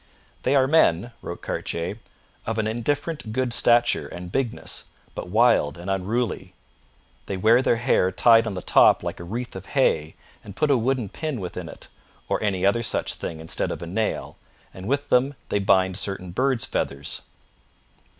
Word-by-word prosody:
'They - - +1
are 135 -1 +5
men,' 120 - +3
wrote - - -7
Cartier, 85 +6 -3 0.5
'of 115 0 -2
an 110 - 0
indifferent 135 +4 -2
good 125 +1 0
stature 120 0 +4
and 90 0 -8
bigness, 130 -1 -2 0.3
but - - -6
wild 110 -8 +3
and 90 +3 -4
unruly. 95 -1 -2 0.7
They 100 - -3
wear 115 +6 +5
their 125 - +2
hair 115 -5 +2
tied 115 +1 +5
on 105 - -3
the 90 - -5
top - - +5
like - - -4
a - - -7
wreath 115 +7 -5
of 95 0 -8
hay 80 - +2 0.3
and 100 -2 -11
put 150 - +1
a - - +5
wooden 125 -1 0
pin 155 - -4
within 90 -2 -6
it, - - -10 0.4
or - - 0
any 95 -3 0
other 100 +4 +3
such 115 - -1
thing 80 - -6
instead 80 0 -1
of - - -5
a - - -4
nail, 105 +6 -2 0.4
and 95 +1 -8
with 140 +3 -1
them 135 +3 +3
they 100 - +1
bind 95 -1 +3
certain 95 -3 -3
birds' 130 +4 +1
feathers. 70 +1 -3
110 Hz, 175 wpm, -24 LUFS, 95-125 Hz, 0.7 s, are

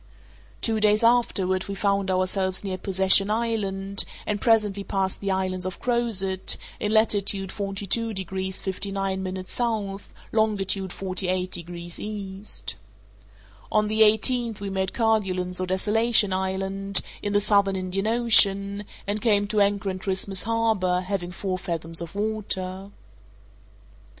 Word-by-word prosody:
Two 225 -1 +2
days 210 +1 +3
afterward 195 -6 +2
we 200 - -4
found 200 0 0
ourselves 185 +1 +1
near 190 -2 -3
Possession 190 +1 +4
Island, 200 -3 0 0.2
and 210 -1 -2
presently 210 -4 +2
passed 195 -1 -2
the 200 - -2
islands 185 -1 -1
of 185 0 -5
Crozet, 215 -6 +1 0.2
in 210 - -1
latitude 200 -3 +2
42 200 +3 -1
degrees 190 -1 -4
59' 190 -1 -3
S., 185 +4 -7 0.7
longitude 195 -3 +1
48 185 -1 -1
degrees 170 0 -6
E. 200 -2 -6 1.3
On 215 0 +2
the 215 +1 +1
eighteenth 225 +1 +3
we 200 -1 -5
made 190 -1 -1
Kerguelen's 190 -6 0
or 185 - -2
Desolation 210 +2 +3
Island, 195 +1 0 0.2
in 205 - -2
the 205 - +4
Southern 200 -1 +2
Indian 190 +2 -2
Ocean, 205 -3 +3 0.2
and 205 +1 -2
came 205 -3 +3
to 210 -1 +2
anchor 200 0 +1
in 185 - -6
Christmas 190 -1 -1
Harbour, 220 -5 +1
having 185 -2 -3
four 185 0 -3
fathoms 165 -2 -4
of 170 +2 -8
water. 195 -3 -3
195 Hz, 130 wpm, -25 LUFS, 190-210 Hz, 1.3 s, Possession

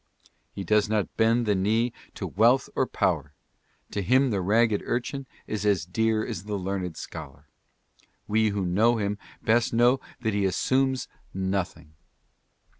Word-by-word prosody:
He 100 - -6
does 105 +2 +2
not 105 -2 -1
bend 115 +2 +3
the 105 - +2
knee 110 +5 +1 0.2
to - - -4
wealth 120 +7 +3
or - - +1
power. - - -1 0.6
To 100 - -2
him 130 +6 +3
the 100 -3 0
ragged 110 +3 +3
urchin 130 +3 -3 0.2
is 105 -2 -3
as 100 -6 +2
dear 110 +4 +1
as 90 - -5
the 105 -1 -3
learned 95 -3 -3
scholar. 75 -3 -9 0.8
We 110 +1 +2
who 100 -2 -1
know 110 +7 +3
him 105 -1 -2 0.2
best 115 +1 +2
know 120 +3 +4 0.2
that 110 -3 0
he 100 -1 +1
assumes 130 +7 +1 0.3
nothing. 95 -5 -3
105 Hz, 150 wpm, -26 LUFS, 95-115 Hz, 0.8 s, know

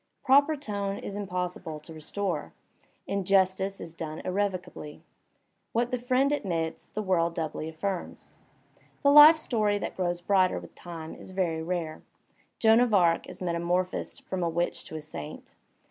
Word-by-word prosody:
Proper 285 +3 +5
tone 205 -8 -3
is 200 - -6
impossible 180 -5 -4
to 160 - -11
restore. 160 +1 -3 0.5
Injustice 195 0 +1
is 165 - -7
done 160 -2 -6
irrevocably. 185 -5 -3 0.7
What 240 +1 +1
the 250 - -1
friend 255 +3 +2
admits 170 - -2
the 215 - -4
world 170 -3 +1
doubly 155 -1 -3
affirms. 180 +3 -5 0.7
The 280 - +6
life 300 +2 +10
story 215 -8 +1
that - - -5
grows 175 -2 -1
brighter 185 0 +2
with - - -9
time 165 -2 -8
is - - -11
very 180 -4 -1
rare. 165 -2 -3 0.6
Joan 225 0 +5
of 245 -3 +3
Arc 170 -3 +3
is 185 +1 -7
metamorphosed 175 +1 -1
from 190 -1 -3
a 170 - +1
witch 170 +1 -1
to - - -8
a 155 - -4
saint. 150 - -8
185 Hz, 150 wpm, -28 LUFS, 170-205 Hz, 0.7 s, life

